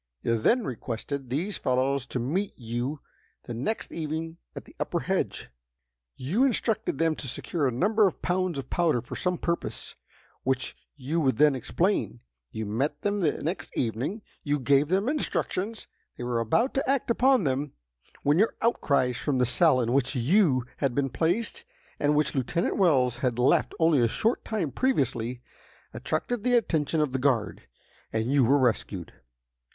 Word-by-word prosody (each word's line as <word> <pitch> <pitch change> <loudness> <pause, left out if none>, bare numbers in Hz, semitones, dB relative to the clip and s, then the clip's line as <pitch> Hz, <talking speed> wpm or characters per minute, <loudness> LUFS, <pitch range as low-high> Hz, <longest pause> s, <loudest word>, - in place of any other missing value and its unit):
You 115 - +2
then 240 - +3
requested 125 +3 -5
these 170 +11 -2
fellows 130 +1 0
to - - -3
meet 165 - -2
you 120 +5 -3 0.4
the 120 - -6
next 135 - -3
evening 160 +1 -4 0.2
at - - -7
the - - -17
upper - - -1
hedge. - - -2 0.7
You 175 - 0
instructed 225 - 0
them 165 0 +2
to 135 - -5
secure 145 +4 -1
a - - 0
number 205 - +3
of 180 - -4
pounds 180 -2 0
of 135 -2 -6
powder 160 -9 +2
for - - -7
some 180 -1 -1
purpose, 170 0 -3 0.5
which 130 0 -1 0.2
you 150 +4 -1
would 130 -6 +2
then 150 +1 +5
explain. 150 - -1 0.3
You 110 - -4
met 135 +8 -2
them 205 0 0
the 160 -6 0
next 170 +6 -4
evening. 130 - -2 0.2
You 145 0 0
gave 140 +2 +3
them 190 +6 +1
instructions. 230 -7 -2 0.3
They - - -5
were 120 -1 -1
about 170 - +1
to 270 - -1
act 270 -3 +1
upon 260 -1 +4
them, 140 0 -1 0.5
when 145 +4 +3
your 220 - +3
outcries 140 - +2
from 145 -3 -1
the 125 - +3
cell 130 +3 +4
in 120 0 0
which 135 +1 +1
you 130 - +3
had 135 -4 0
been 140 -1 +1
placed, 175 - -1 0.4
and 150 0 +2
which 150 0 +1
Lieutenant 145 +6 0
Wells 130 - +3
had 125 -2 0
left 125 +1 +2
only 160 -5 +4
a 120 - +4
short 225 - 0
time 190 -10 -2
previously, 125 - 0 0.5
attracted 155 - -2
the 250 -1 +3
attention 160 -8 +1
of 150 -3 0
the 135 - -1
guard, 125 -5 0 0.4
and 110 +3 -1
you 140 -2 +4
were 135 +5 +4
rescued. 110 - -1
145 Hz, 170 wpm, -27 LUFS, 125-180 Hz, 0.7 s, then